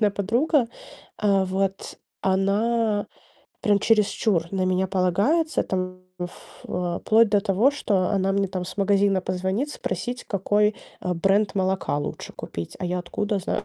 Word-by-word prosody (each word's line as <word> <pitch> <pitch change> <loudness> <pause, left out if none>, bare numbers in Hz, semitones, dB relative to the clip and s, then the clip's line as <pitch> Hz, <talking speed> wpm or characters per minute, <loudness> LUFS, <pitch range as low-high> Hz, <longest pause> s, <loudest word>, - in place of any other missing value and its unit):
конкретная 210 -2 +4
подруга. 235 - +1 0.5
А, 200 -2 +3
вот. 190 +1 -2 0.2
Она 205 +3 +1 0.5
прям 205 -1 +3
чересчур 205 -5 +2
на 190 -1 0
меня 185 +1 +1
полагается, 200 - +2
там, 185 -1 -3 0.2
в 175 0 -4 0.4
э, 175 -1 -2
вплоть 220 0 +4
до 205 -1 +4
того, 200 +8 +3
что 200 -10 0
она 195 -1 +1
мне, 200 0 +1
там, 185 -1 -3
с 180 - -8
магазина 200 -1 +3
позвонит 190 +10 -2
спросить, 245 -3 -4
какой, 205 +2 +1 0.2
э, 180 -1 -1
бренд 195 +5 +2
молока 190 -5 0
лучше 145 - -5
купить. 85 0 -7
А 185 - -4
я 180 +1 -1
откуда 205 +3 -2
зна 205 +3 -2
195 Hz, 150 wpm, -24 LUFS, 185-210 Hz, 0.5 s, конкретная